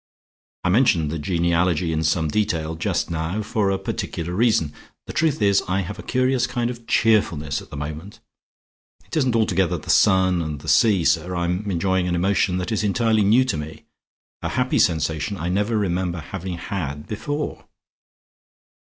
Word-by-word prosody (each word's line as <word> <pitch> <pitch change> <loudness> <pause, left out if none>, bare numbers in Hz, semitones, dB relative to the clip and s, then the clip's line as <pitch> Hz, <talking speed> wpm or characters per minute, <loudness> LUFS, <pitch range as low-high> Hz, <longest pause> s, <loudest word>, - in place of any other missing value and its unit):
I 90 - +1
mention 90 - +3
the 80 +1 -3
genealogy 85 0 +1
in 80 0 -1
some 80 0 +1
detail 80 -3 -1
just 80 - -1
now 85 +6 -2
for 105 -1 0
a 95 - +1
particular 85 -2 -4
reason. 110 -8 +2 0.3
The - - -7
truth 155 -8 +1
is 100 -1 +4
I 95 +1 0
have 100 +2 -6
a - - -4
curious 130 -1 +1
kind 120 -1 -1
of 120 -1 -11
cheerfulness 85 - +2
at - - -14
the - - -8
moment. 75 +7 -7 0.9
It 95 - -8
isn't 130 -6 +2
altogether 95 -5 +1
the - - -3
sun 95 -2 +4
and 75 -3 -5
the - - -11
sea, 100 -7 +4
sir. 90 +3 +1
I 85 0 -1
am 90 +4 -2
enjoying 95 0 0
an 90 - 0
emotion 95 +1 +1
that 90 +5 -3
is 110 - 0
entirely 110 +1 +2
new 115 +6 +4
to 125 - -1
me; 75 +1 -8 0.6
a - - -2
happy - - 0
sensation 80 +5 0
I 85 -1 -3
never 105 +4 0
remember 90 -3 -1
having 90 +2 -6
had 75 -6 -4
before." 145 +8 -4
95 Hz, 175 wpm, -22 LUFS, 85-105 Hz, 0.9 s, is